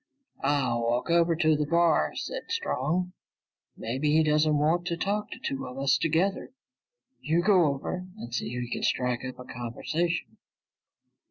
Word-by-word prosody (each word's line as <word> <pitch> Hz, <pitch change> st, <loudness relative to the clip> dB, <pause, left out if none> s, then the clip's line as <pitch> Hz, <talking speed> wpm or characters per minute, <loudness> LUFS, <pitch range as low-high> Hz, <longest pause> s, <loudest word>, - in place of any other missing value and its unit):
"I'll 135 Hz, -4 st, +1 dB
walk 120 Hz, +7 st, 0 dB
over 170 Hz, 0 st, +4 dB
to 160 Hz, -1 st, +3 dB
the 150 Hz, 0 st, -1 dB
bar," 170 Hz, 0 st, +3 dB
said -, -, -5 dB
Strong. 180 Hz, -, -1 dB, 0.6 s
"Maybe 130 Hz, +6 st, -1 dB
he 160 Hz, +1 st, +5 dB
doesn't 150 Hz, 0 st, +3 dB
want 165 Hz, +4 st, +1 dB
to 170 Hz, -, -1 dB
talk 205 Hz, +3 st, -1 dB
to -, -, -7 dB
two 135 Hz, -, -4 dB
of 125 Hz, +1 st, -9 dB
us 135 Hz, 0 st, +3 dB
together. 165 Hz, -, 0 dB, 0.7 s
You 165 Hz, +3 st, +1 dB
go 185 Hz, -3 st, +5 dB
over 150 Hz, +6 st, -2 dB
and 120 Hz, -, -8 dB
see 125 Hz, -, -1 dB
if 125 Hz, +1 st, -3 dB
you 120 Hz, -, -7 dB
can -, -, -2 dB
strike 125 Hz, -1 st, 0 dB
up 130 Hz, 0 st, -6 dB
a 125 Hz, -, -10 dB
conversation." 155 Hz, +9 st, -3 dB
155 Hz, 165 wpm, -28 LUFS, 130-175 Hz, 0.7 s, he